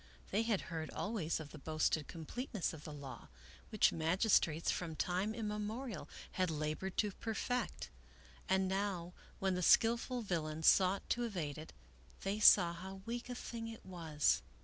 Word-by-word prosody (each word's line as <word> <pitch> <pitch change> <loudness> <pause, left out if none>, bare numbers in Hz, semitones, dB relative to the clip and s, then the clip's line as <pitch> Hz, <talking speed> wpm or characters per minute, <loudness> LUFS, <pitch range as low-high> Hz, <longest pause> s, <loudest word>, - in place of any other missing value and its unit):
They 205 - +2
had 225 -4 +1
heard 160 -2 -5
always 200 -8 -2
of 155 -2 -7
the 155 - -9
boasted 155 +1 0
completeness 200 - -3
of 155 -2 -10
the 155 - -6
law 140 -3 -8 0.4
which 215 -2 +4
magistrates 165 -1 +2
from 165 -3 -3
time 185 +7 0
im 225 -2 -3
memorial 210 +3 -4 0.2
had 185 -1 0
labored 155 +4 -3
to 210 -2 +2
perfect, 230 +4 -3 0.6
and 190 0 +3
now 190 -3 -2 0.2
when 190 -1 +1
the 180 - -1
skillful 235 +5 +4
villain 160 -5 -2
sought 190 +3 +5
to 240 - +1
evade 170 -11 -3
it, 155 - -9 0.5
they 195 +2 -1
saw 175 -5 +8
how 190 +3 -8
weak 240 +1 -4
a 245 - -3
thing 230 -2 -5
it 225 -1 -9
was. 165 -5 +1
190 Hz, 160 wpm, -36 LUFS, 160-215 Hz, 0.6 s, saw